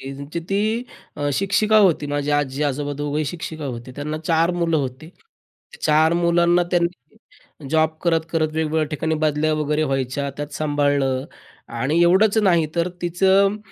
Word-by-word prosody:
त्यांची 140 +4 -6
ती 215 +4 0 0.3
अ, 145 - -1
शिक्षिका 200 +6 +2
होती. 180 -7 +3
माझी 145 0 -2
आजी-आजोबा 145 0 -1
दोघंही 145 +1 -2
शिक्षिका 160 0 -6
होती. 125 -2 -6
त्यांना 150 +1 -4
4 165 +1 +2
मुलं 170 -2 0
होती. 135 +2 -4 0.7
4 155 +2 +3
मुलांना 175 0 +3
त्यांनी 170 - -5
जॉब 160 0 +3
करत, 165 -2 +2
करत 160 -2 +1
वेगवेगळ्या 160 0 0
ठिकाणी 160 +1 -2
बदल्या 155 +1 +1
वगैरे 150 0 0
व्हायच्या, 135 0 -2
त्यात 145 0 -4
सांभाळलं. 145 -3 0 0.4
आणि 135 +8 0
एवढंच 200 +5 +4
नाही 175 -6 +3
तर 170 0 +1
तिचं 190 +4 +3
155 Hz, 140 wpm, -21 LUFS, 145-175 Hz, 0.7 s, एवढंच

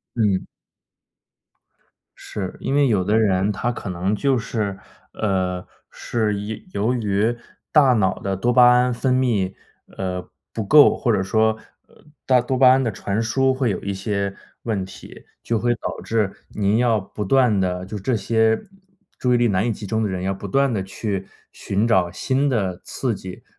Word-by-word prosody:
嗯。 105 -5 +1 1.7
是， 95 -3 -6
因 - - -2
为 145 -1 +4
有 105 -6 +2
的 105 +4 +2
人 100 -2 +2
他 120 +4 -2
可 115 - -6
能 90 +3 -1
就 135 +3 +1
是 105 -4 -3 0.4
呃， 95 -3 -1 0.3
是 110 -3 -1
一 105 - -7
由 110 +5 0
于 110 0 0 0.4
大 140 -5 +5
脑 95 -5 +1
的 95 -1 -2
多 120 +6 0
巴 125 0 +6
胺 125 0 +3
分 125 +2 0
泌， 110 -8 +1 0.4
呃， 90 -1 -4 0.2
不 110 - -3
够， 145 +7 +7
或 120 - +1
者 100 -3 +1
说， 110 +3 +2 0.3
呃， - - -23 0.2
大 130 -2 +4
多 130 +2 -2
巴 130 0 +7
胺 130 +1 +4
的 115 - 0
传 100 +2 -2
输 130 +4 +2
会 130 -2 0
有 100 - -2
一 100 - -3
些 100 0 -2 0.3
问 105 -5 -1
题， 95 - -13 0.2
就 115 -1 0
会 120 +3 +1
导 - - -6
致 110 -3 0 0.2
您 105 +1 0
要 115 -2 +2
不 105 +2 -6
断 120 -1 +3
地 90 -1 -1
就 105 +2 -6
这 115 +6 0
些 110 +1 +2 0.6
注 125 -1 +1
意 120 - +4
力 120 - +3
难 100 -1 +1
以 - - +1
集 105 - -6
中 110 +2 -1
的 105 - 0
人， 90 -1 -3
要 95 +1 0
不 95 +1 -7
断 135 +6 +2
地 100 -3 -1
去 95 0 -4 0.2
寻 100 +4 -1
找 90 -6 +2
新 135 +8 0
的 95 -8 -1
刺 125 -5 -2
激， 95 -1 -9
110 Hz, 195 characters per minute, -22 LUFS, 95-120 Hz, 1.7 s, 够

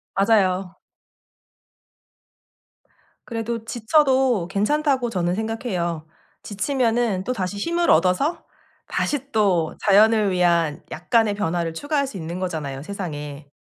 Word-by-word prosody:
맞아요. 195 -3 +2 2.5
그래도 230 -1 -4
지쳐도 255 - +2
괜찮다고 260 - +1
저는 180 -3 -1
생각해요. 195 -8 -3 0.4
지치면은 230 -2 0
또다시 205 -4 -3
힘을 340 +10 0
얻어서 190 - +2 0.4
다시 280 -1 -2
또 185 -7 +1
자연을 210 0 +5
위한 170 -4 +1
약간의 225 -4 +1
변화를 170 -4 -1
추가할 285 - -1
수 215 - -8
있는 170 +2 -5
거잖아요, 155 -7 -4
세상에. 150 -5 -6
205 Hz, 255 characters per minute, -22 LUFS, 175-240 Hz, 2.5 s, 자연을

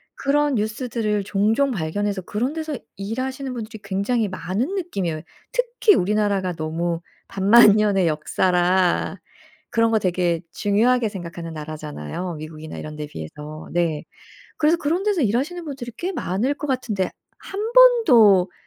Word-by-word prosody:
그런 290 0 +1
뉴스들을 215 -1 -1
종종 210 +7 +1
발견해서 200 0 -2
그런 240 - -2
데서 315 -2 -4 0.2
일하시는 255 +6 -4
분들이 225 -2 -6
굉장히 200 +4 0
많은 190 - -3
느낌이에요. 195 - -3 0.3
특히 - - +3
우리나라가 200 - +1
너무 165 +1 -2 0.3
반만년의 205 -2 +5
역사라 180 +4 +1 0.5
그런 230 0 +2
거 220 - +3
되게 175 -3 0
중요하게 225 +3 +2
생각하는 170 -4 -7
나라잖아요, 155 - -6
미국이나 155 0 -8
이런 155 0 -7
데 150 0 -5
비해서. 150 - -9
네. 170 -3 0 0.5
그래서 315 +3 +3
그런 330 +3 0
데서 410 -5 +1
일하시는 275 - -1
분들이 270 -5 -6
꽤 365 +2 -2
많을 245 - -1
것 295 0 -6
같은데 235 -8 -1 0.3
1 420 +4 -4
번도 250 - +6
205 Hz, 325 characters per minute, -22 LUFS, 175-260 Hz, 0.5 s, 번도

